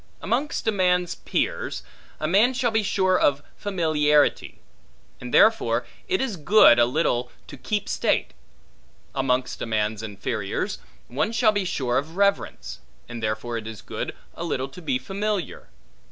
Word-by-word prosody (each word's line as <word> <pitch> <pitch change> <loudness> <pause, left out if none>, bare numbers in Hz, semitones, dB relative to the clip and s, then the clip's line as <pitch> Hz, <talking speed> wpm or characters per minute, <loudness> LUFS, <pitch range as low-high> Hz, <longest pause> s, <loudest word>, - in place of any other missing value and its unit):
Amongst 245 +8 -2
a - - +4
man's 180 -3 +1
peers, - - -2 0.4
a 155 - -1
man 215 +9 +4
shall 245 -2 +1
be 220 0 +2
sure 190 -2 +2
of 145 0 +2
familiarity; 155 -7 +1 0.6
and 125 -1 -7
therefore 125 - +4 0.2
it 375 0 +1
is 245 -8 -2
good, 160 - +6
a 120 - +6
little 125 -3 0
to - - -10
keep 210 -2 -3
state. - - 0 0.8
Amongst 130 -1 -1
a - - -3
man's 110 -1 -1
inferiors 105 -1 -3 0.3
one 150 - -1
shall 225 -1 +3
be 205 -2 -1
sure 130 -8 0
of 160 +5 -8
reverence; 200 0 0 0.3
and 120 -1 -7
therefore 110 +2 -2
it 110 -1 -6
is 110 -2 -8
good, - - -5 0.2
a - - -6
little 135 -5 -2
to 180 - -12
be 140 -6 0
familiar. 200 +4 -4
155 Hz, 155 wpm, -24 LUFS, 120-200 Hz, 0.8 s, good